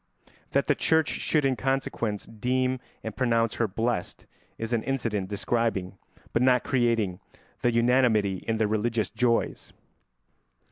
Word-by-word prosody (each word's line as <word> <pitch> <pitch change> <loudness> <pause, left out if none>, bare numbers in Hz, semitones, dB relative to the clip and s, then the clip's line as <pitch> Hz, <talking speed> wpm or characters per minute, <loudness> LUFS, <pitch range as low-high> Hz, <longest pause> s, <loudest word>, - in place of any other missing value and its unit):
That - - +1
the - - +3
Church 160 -3 +2
should 150 -3 0
in 135 -1 +2
consequence 125 -6 -2
deem 130 +3 -1 0.2
and 110 -2 -5
pronounce 115 -3 +1
her 115 - +3
blessed 110 -1 -2 0.3
is 115 +1 -3
an 115 - +2
incident 110 -7 -2
describing, 100 -2 -1 0.4
but 115 - +2
not 125 -1 +4
creating, 115 -8 +1 0.4
the 120 - +3
unanimity 115 -5 +3
in 115 -1 +1
their 110 -1 +2
religious 110 +1 0
joys. 120 -2 0
115 Hz, 135 wpm, -27 LUFS, 110-125 Hz, 0.4 s, not